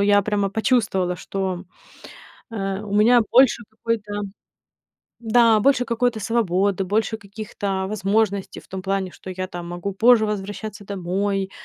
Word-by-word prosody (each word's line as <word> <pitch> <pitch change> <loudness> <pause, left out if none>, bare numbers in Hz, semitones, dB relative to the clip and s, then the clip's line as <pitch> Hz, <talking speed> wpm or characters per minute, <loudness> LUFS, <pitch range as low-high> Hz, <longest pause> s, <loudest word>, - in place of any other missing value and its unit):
я 205 0 +4
прямо 205 -1 0
почувствовала, 200 -4 +1
что, 190 0 -4 0.9
а, 195 -1 -3
у 200 - -6
меня 235 +3 +6
больше 255 -1 +5
какой-то 220 -1 -3 1.1
Да, 225 -1 +4
больше 265 +1 +3
какой-то 235 0 0
свободы, 200 -3 +1
больше 220 +3 0
каких-то 200 -2 -4
возможностей 200 0 0
в - - -14
том 190 - -5
плане, 195 0 -2
что 190 - -13
я 185 0 -4
там 175 -1 -7
могу 175 +3 -4
позже 225 +3 +5
возвращаться 205 0 -5
домой. 195 +1 -2
205 Hz, 135 wpm, -22 LUFS, 190-220 Hz, 1.1 s, меня